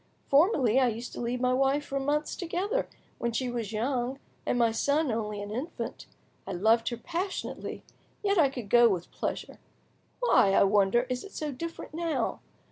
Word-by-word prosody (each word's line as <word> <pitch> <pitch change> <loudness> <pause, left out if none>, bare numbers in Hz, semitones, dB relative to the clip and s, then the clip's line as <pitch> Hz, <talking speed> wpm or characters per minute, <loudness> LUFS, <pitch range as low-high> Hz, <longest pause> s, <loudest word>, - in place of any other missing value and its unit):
Formerly, 275 - +4
I 255 - +4
used 235 +1 -4
to - - -5
leave 240 +1 -1
my 250 0 +3
wife 270 +3 +2
for 275 - -2
months 295 +2 0
together, 385 +7 -2 0.3
when 235 - 0
she 250 +1 -1
was 230 -4 -3
young 245 +3 -1 0.3
and - - +1
my 235 -2 +4
son 285 +5 +1
only, 210 -2 -3
an 205 - -7
infant; 270 +10 -5 0.4
I 195 - -3
loved 225 +5 +3
her 235 - -4
passionately, 345 - -4 0.4
yet 400 -2 +2
I 285 -4 +5
could 245 -5 -6
go 240 +2 +6
with 180 -4 -2
pleasure. - - -4 0.6
Why, 215 - +4
I - - +6
wonder, 200 +3 +4
is 250 -1 -3
it 400 - -11
so 300 -1 -3
different 330 +5 -7
now? 330 -1 -1
250 Hz, 180 wpm, -29 LUFS, 230-300 Hz, 0.6 s, go